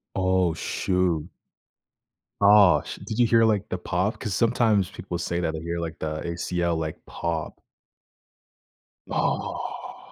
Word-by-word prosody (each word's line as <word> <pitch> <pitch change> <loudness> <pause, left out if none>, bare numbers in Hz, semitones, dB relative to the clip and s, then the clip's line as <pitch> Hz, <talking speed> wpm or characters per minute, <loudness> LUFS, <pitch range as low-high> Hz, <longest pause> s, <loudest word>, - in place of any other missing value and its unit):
Oh, 95 -2 +2
shoot. 90 -1 -1 1.1
Ah, 100 -7 +7
sh - - -7
did 110 - -5
you 120 - +5
hear, 115 0 +5
like, 105 -3 +2
the 90 - -3
pop? 90 +4 -1
'Cause 105 -5 -4
sometimes 110 -5 +2
people 90 -2 -6
say 85 0 -2
that 80 -2 -1
they 80 - -4
hear, 85 +1 -4
like, 85 -1 -5
the 75 0 -3
ACL, 85 0 -1
like, 80 -1 -5
pop. 85 -2 -4 1.5
Ah. - - -3
90 Hz, 135 wpm, -25 LUFS, 85-100 Hz, 1.5 s, Ah